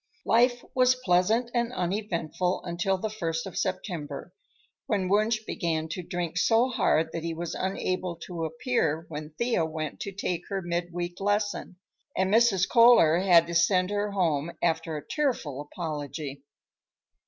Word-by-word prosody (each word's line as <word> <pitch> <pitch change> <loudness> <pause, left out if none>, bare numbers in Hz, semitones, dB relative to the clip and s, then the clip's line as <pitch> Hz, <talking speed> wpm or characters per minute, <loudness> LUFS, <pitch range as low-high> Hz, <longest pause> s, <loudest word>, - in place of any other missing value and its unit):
Life 245 +1 +3
was 255 0 +4
pleasant 215 +7 +2
and 240 -1 0
uneventful 180 -3 -2
until 175 +2 -1
the 220 - -2
first 165 -6 -3
of 190 - -8
September, 180 -5 -4 0.5
when 200 -4 0
Wunsch 215 +3 +2
began 160 -2 -2
to 180 - -4
drink 175 -1 -3
so 235 +3 +3
hard 160 -9 +1
that 165 - -4
he 165 -1 -3
was 170 0 -4
unable 185 -1 -2
to 170 -3 -4
appear 160 - -1
when 150 0 -7
Thea 235 -8 +1
went 155 -1 -4
to 200 - -4
take 185 -3 -2
her 195 -2 -2
mid 175 0 -2
week 175 0 -4
lesson, 205 -1 -1 0.4
and 190 +1 +1
Mrs. 220 -5 +4
Kohler 230 -9 +6
had 175 -3 +6
to 170 - -6
send 180 +2 +3
her 205 0 0
home 170 -5 0
after 165 -1 0
a 150 - -8
tearful 235 - -1
apology. 145 -2 -5
180 Hz, 155 wpm, -27 LUFS, 165-205 Hz, 0.5 s, Kohler